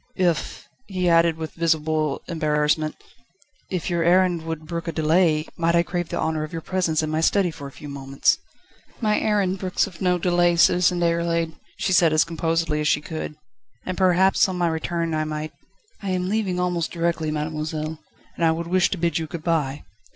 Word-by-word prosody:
"If 175 Hz, -4 st, -1 dB
..." -, -, -43 dB
he 185 Hz, -2 st, -1 dB
added, 165 Hz, -1 st, +4 dB
with 160 Hz, -1 st, -5 dB
visible 155 Hz, -3 st, 0 dB
embarrassment, 155 Hz, -2 st, 0 dB, 0.7 s
"if 180 Hz, -3 st, -3 dB
your 170 Hz, -2 st, 0 dB
errand 175 Hz, 0 st, +3 dB
would 160 Hz, -1 st, -5 dB
brook 170 Hz, +1 st, -5 dB
a -, -, 0 dB
delay, 160 Hz, 0 st, +2 dB
might 170 Hz, 0 st, +2 dB
I 170 Hz, -, +4 dB
crave 175 Hz, -1 st, -3 dB
the -, -, -3 dB
honour 160 Hz, -1 st, -1 dB
of 155 Hz, -, -6 dB
your 165 Hz, -2 st, -5 dB
presence 170 Hz, -4 st, 0 dB
in 155 Hz, -, -2 dB
my 155 Hz, +1 st, 0 dB
study 185 Hz, +1 st, +2 dB
for 145 Hz, -3 st, -8 dB
a -, -, -10 dB
few 150 Hz, -, -11 dB
moments?" 135 Hz, -1 st, 0 dB, 0.6 s
"My 215 Hz, -2 st, +2 dB
errand 195 Hz, -3 st, +1 dB
brooks 185 Hz, -1 st, 0 dB
of 180 Hz, -4 st, -12 dB
no 180 Hz, -1 st, +2 dB
delay, 175 Hz, 0 st, +2 dB
Citizen 175 Hz, +1 st, +4 dB
Déroulède," 170 Hz, -1 st, +1 dB, 0.2 s
she 190 Hz, -, 0 dB
said 170 Hz, -2 st, +5 dB
as 155 Hz, -, +5 dB
composedly 165 Hz, -1 st, -1 dB
as 150 Hz, -, 0 dB
she 150 Hz, -, +3 dB
could, 155 Hz, 0 st, -6 dB, 0.5 s
"and 185 Hz, -, -3 dB
perhaps 190 Hz, +1 st, +4 dB
on 185 Hz, -, -3 dB
my 175 Hz, -1 st, +2 dB
return 165 Hz, +1 st, -2 dB
I 155 Hz, 0 st, 0 dB
might 155 Hz, 0 st, -4 dB, 0.3 s
..." 425 Hz, -, -35 dB
"I 200 Hz, -, -4 dB
am 185 Hz, 0 st, -1 dB
leaving 200 Hz, -4 st, 0 dB
almost 180 Hz, -2 st, -1 dB
directly, 170 Hz, -2 st, -1 dB
mademoiselle, 155 Hz, +1 st, -3 dB, 0.4 s
and -, -, -3 dB
I 165 Hz, -, +5 dB
would 165 Hz, +1 st, -3 dB
wish 180 Hz, +1 st, +2 dB
to 195 Hz, -, -3 dB
bid 170 Hz, -1 st, 0 dB
you 160 Hz, -, -4 dB
good 155 Hz, +1 st, -7 dB
bye." 150 Hz, -5 st, -1 dB
165 Hz, 200 wpm, -23 LUFS, 155-180 Hz, 0.7 s, said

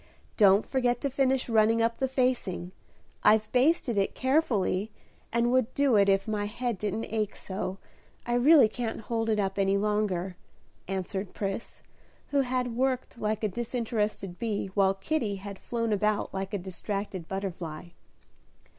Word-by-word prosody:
Don't 200 Hz, 0 st, +5 dB
forget 245 Hz, -2 st, +1 dB
to 280 Hz, -, -1 dB
finish 265 Hz, -1 st, +1 dB
running 225 Hz, 0 st, +3 dB
up 230 Hz, 0 st, +1 dB
the 265 Hz, -, +1 dB
facing; 250 Hz, -9 st, -1 dB, 0.5 s
I've 215 Hz, 0 st, +4 dB
basted 255 Hz, -4 st, +2 dB
it 195 Hz, -, 0 dB
carefully, 235 Hz, -8 st, +1 dB, 0.4 s
and 235 Hz, +1 st, +2 dB
would 255 Hz, -1 st, +2 dB
do 280 Hz, -4 st, +3 dB
it 200 Hz, -1 st, +5 dB
if 195 Hz, +1 st, +2 dB
my 210 Hz, -1 st, -1 dB
head 230 Hz, 0 st, -3 dB
didn't 210 Hz, +2 st, -2 dB
ache 215 Hz, -2 st, -2 dB
so, 190 Hz, 0 st, -5 dB, 0.5 s
I 240 Hz, -, -1 dB
really 265 Hz, +1 st, +7 dB
can't 225 Hz, 0 st, -4 dB
hold 225 Hz, 0 st, -2 dB
it 215 Hz, -1 st, +2 dB
up 195 Hz, 0 st, -1 dB
any 195 Hz, 0 st, +3 dB
longer," 200 Hz, -3 st, -1 dB, 0.5 s
answered 190 Hz, +1 st, -4 dB
Pris, 195 Hz, +2 st, -4 dB, 0.5 s
who 285 Hz, -1 st, +3 dB
had 250 Hz, -2 st, -1 dB
worked 255 Hz, -1 st, -1 dB
like 215 Hz, +1 st, -1 dB
a -, -, +3 dB
disinterested 215 Hz, -4 st, -3 dB
bee, 210 Hz, -4 st, -2 dB
while 195 Hz, -1 st, +3 dB
Kitty 215 Hz, -1 st, -1 dB
had 195 Hz, 0 st, -8 dB
flown 230 Hz, -2 st, -1 dB
about 210 Hz, +1 st, 0 dB
like 190 Hz, 0 st, -3 dB
a -, -, +1 dB
distracted 190 Hz, 0 st, -5 dB
butterfly. 175 Hz, -4 st, -5 dB
215 Hz, 155 wpm, -28 LUFS, 195-245 Hz, 0.5 s, really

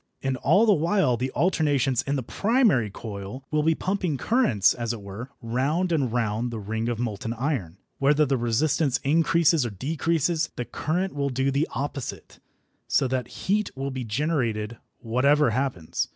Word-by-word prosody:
And 135 Hz, -1 st, 0 dB
all 175 Hz, -, +4 dB
the 215 Hz, -, +5 dB
while 165 Hz, -5 st, +2 dB
the 125 Hz, +3 st, -2 dB
alternations 145 Hz, -6 st, +2 dB
in 140 Hz, -, -2 dB
the 130 Hz, -, -2 dB
primary 205 Hz, -, +2 dB
coil 105 Hz, +4 st, -7 dB
will 150 Hz, 0 st, +2 dB
be 160 Hz, +1 st, +2 dB
pumping 185 Hz, -5 st, -1 dB
currents, 125 Hz, -, +3 dB
as 120 Hz, -1 st, -3 dB
it 115 Hz, -, -7 dB
were, 100 Hz, +6 st, -7 dB
round 140 Hz, +10 st, 0 dB
and 140 Hz, -8 st, +1 dB
round 115 Hz, 0 st, -1 dB
the 115 Hz, -, -5 dB
ring 110 Hz, +3 st, -3 dB
of 120 Hz, -, -2 dB
molten 115 Hz, 0 st, -3 dB
iron. 120 Hz, -, -2 dB, 0.2 s
Whether 145 Hz, +2 st, +4 dB
the 135 Hz, -1 st, +1 dB
resistance 130 Hz, +3 st, +1 dB
increase 165 Hz, +3 st, +3 dB
or 120 Hz, -, -2 dB
decrease, 160 Hz, -, 0 dB
the 120 Hz, -, -3 dB
current 180 Hz, +9 st, -2 dB
will 140 Hz, -1 st, -1 dB
do 135 Hz, +1 st, 0 dB
the 140 Hz, +3 st, +1 dB
opposite, 140 Hz, -1 st, -5 dB, 0.5 s
so 135 Hz, -, +2 dB
that 125 Hz, -2 st, -1 dB, 0.2 s
heat 205 Hz, +2 st, +1 dB
will 135 Hz, +1 st, -3 dB
be 130 Hz, -1 st, -4 dB
generated 115 Hz, -3 st, -1 dB, 0.2 s
whatever 130 Hz, +3 st, +3 dB
happens. 120 Hz, -, -2 dB
135 Hz, 165 wpm, -25 LUFS, 115-155 Hz, 0.5 s, the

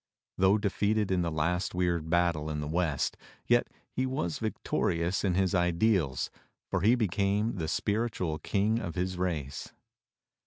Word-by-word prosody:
Though 95 Hz, +2 st, +5 dB
defeated 105 Hz, 0 st, 0 dB
in 90 Hz, -1 st, +2 dB
the 85 Hz, -, 0 dB
last 85 Hz, +4 st, -1 dB
weird 85 Hz, -3 st, 0 dB
battle 85 Hz, -3 st, +1 dB
in 75 Hz, -1 st, -2 dB
the 75 Hz, -, -3 dB
west, 80 Hz, -3 st, 0 dB, 0.3 s
yet -, -, +3 dB, 0.2 s
he 130 Hz, +1 st, -1 dB
was 85 Hz, -11 st, -2 dB
vic 110 Hz, -1 st, -2 dB
torious 85 Hz, +3 st, 0 dB
in 95 Hz, -3 st, +1 dB
his 95 Hz, +1 st, +2 dB
ideals, 90 Hz, -, +1 dB, 0.4 s
for -, -, +1 dB
he 115 Hz, +5 st, +5 dB
became 105 Hz, 0 st, 0 dB
the 80 Hz, -3 st, -2 dB
spiritual 100 Hz, -4 st, -1 dB
King 105 Hz, +7 st, +1 dB
of 85 Hz, -, -5 dB
his 90 Hz, 0 st, -2 dB
race. 75 Hz, -7 st, -3 dB
90 Hz, 155 wpm, -30 LUFS, 85-105 Hz, 0.4 s, Though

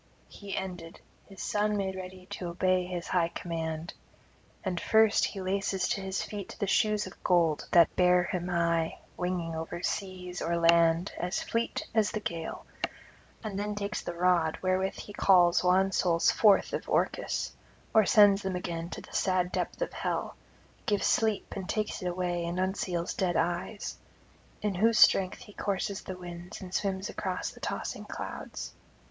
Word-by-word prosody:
He 200 Hz, -1 st, -7 dB
ended: 180 Hz, -2 st, -6 dB, 0.3 s
his 195 Hz, -2 st, -8 dB
son 210 Hz, 0 st, +1 dB
made 190 Hz, -1 st, -2 dB
ready 185 Hz, 0 st, -8 dB
to 180 Hz, -, -4 dB
obey 180 Hz, +1 st, +1 dB
his 175 Hz, -2 st, -5 dB
high 175 Hz, -2 st, +2 dB
command. 165 Hz, -1 st, -4 dB, 0.7 s
And 185 Hz, -4 st, -2 dB
first 220 Hz, -1 st, +4 dB
he 195 Hz, -, -5 dB
laces 190 Hz, 0 st, 0 dB
to 195 Hz, -, 0 dB
his 190 Hz, 0 st, -2 dB
feet 205 Hz, -3 st, -6 dB
the -, -, +1 dB
shoes 210 Hz, +1 st, +2 dB
of 185 Hz, -, -12 dB
gold 170 Hz, -4 st, +2 dB
that 170 Hz, -2 st, +6 dB
bear 180 Hz, 0 st, +5 dB
him 175 Hz, 0 st, -3 dB
high 170 Hz, -2 st, +1 dB, 0.2 s
winging 180 Hz, -2 st, -2 dB
over 165 Hz, +2 st, -5 dB
seas 185 Hz, -2 st, -3 dB
or 170 Hz, -, 0 dB
land 170 Hz, +1 st, +4 dB
as 180 Hz, +2 st, -1 dB
fleet 230 Hz, 0 st, -2 dB
as 220 Hz, -2 st, +3 dB
the 215 Hz, -, -3 dB
gale; 165 Hz, -5 st, -5 dB, 0.8 s
then 210 Hz, 0 st, -3 dB
takes 200 Hz, -2 st, -3 dB
the 175 Hz, -, -5 dB
rod 170 Hz, -2 st, +2 dB
wherewith 185 Hz, +1 st, +1 dB
he 205 Hz, -, -9 dB
calls 180 Hz, -4 st, +5 dB
wan 190 Hz, +2 st, +4 dB
souls 170 Hz, -3 st, +3 dB
forth 210 Hz, -3 st, +4 dB
of -, -, -3 dB
Orcus, -, -, 0 dB, 0.4 s
or 220 Hz, -, +7 dB
sends 205 Hz, -1 st, +6 dB
them 190 Hz, -1 st, -2 dB
again 170 Hz, -2 st, -4 dB
to -, -, -7 dB
the -, -, -15 dB
sad 185 Hz, -1 st, +1 dB
depth -, -, -2 dB
of -, -, -5 dB
hell, -, -, -2 dB, 0.5 s
gives 205 Hz, -2 st, +1 dB
sleep 220 Hz, -2 st, +1 dB
and 190 Hz, -1 st, -5 dB
takes 215 Hz, -1 st, -1 dB
it 180 Hz, -, -2 dB
away 175 Hz, -1 st, -1 dB
and 170 Hz, +1 st, -3 dB
unseals 185 Hz, -2 st, -1 dB
dead 180 Hz, -2 st, 0 dB
eyes; 175 Hz, +5 st, -2 dB, 0.7 s
in 210 Hz, -2 st, +1 dB
whose 220 Hz, +5 st, +3 dB
strength 185 Hz, -1 st, +5 dB
he 205 Hz, -, -13 dB
courses 200 Hz, -1 st, -2 dB
the 185 Hz, -, -7 dB
winds 175 Hz, 0 st, -8 dB
and 185 Hz, -1 st, -9 dB
swims 195 Hz, 0 st, -1 dB
across 185 Hz, -2 st, -3 dB
the -, -, -15 dB
tossing -, -, -4 dB
clouds. -, -, -6 dB
185 Hz, 165 wpm, -29 LUFS, 175-200 Hz, 0.8 s, or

